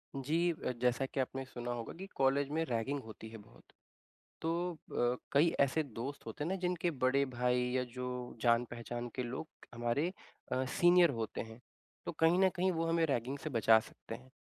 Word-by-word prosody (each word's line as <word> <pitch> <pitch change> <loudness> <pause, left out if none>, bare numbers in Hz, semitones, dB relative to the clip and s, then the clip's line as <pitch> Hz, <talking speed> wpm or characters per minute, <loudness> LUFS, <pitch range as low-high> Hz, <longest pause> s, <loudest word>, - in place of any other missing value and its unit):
जी 160 +6 +1
अ, 155 - -3
जैसा 125 +2 +2
कि 135 - -4
आपने 135 0 -1
सुना 120 -2 -5
होगा 120 -1 -4
कि 190 - -6
कॉलेज 135 +1 +2
में 160 +2 +1
रैगिंग 125 +2 -1
होती 110 0 -9
है 115 - -8
बहुत 105 0 -17 0.8
तो 170 +2 0
अ, 125 -6 -1 0.2
कई 145 +4 +6
ऐसे 140 +3 +3
दोस्त 135 +1 -6
होते 115 +6 -4
हैं - - -2
ना 190 - 0
जिनके 180 -1 0
बड़े 135 -1 +2
भाई 125 0 +2
या 130 0 +1
जो 125 0 -3 0.4
जान-पहचान 120 0 0
के 130 - -1
लोग 125 +6 -4 0.3
हमारे 120 +8 0 0.4
अ, 130 - +1
सीनियर 175 +5 +5
होते 110 -1 -3
हैं। 110 +1 -8 0.5
तो - - -2
कहीं 165 +2 +4
न 190 0 +6
कहीं 185 +2 +3
वो 165 -1 0
हमें 165 0 +3
रैगिंग 135 -1 -1
से 155 - -5
बचा 115 -2 +6
सकते - - -9
हैं। 65 +1 -12
135 Hz, 190 wpm, -34 LUFS, 120-160 Hz, 0.8 s, कई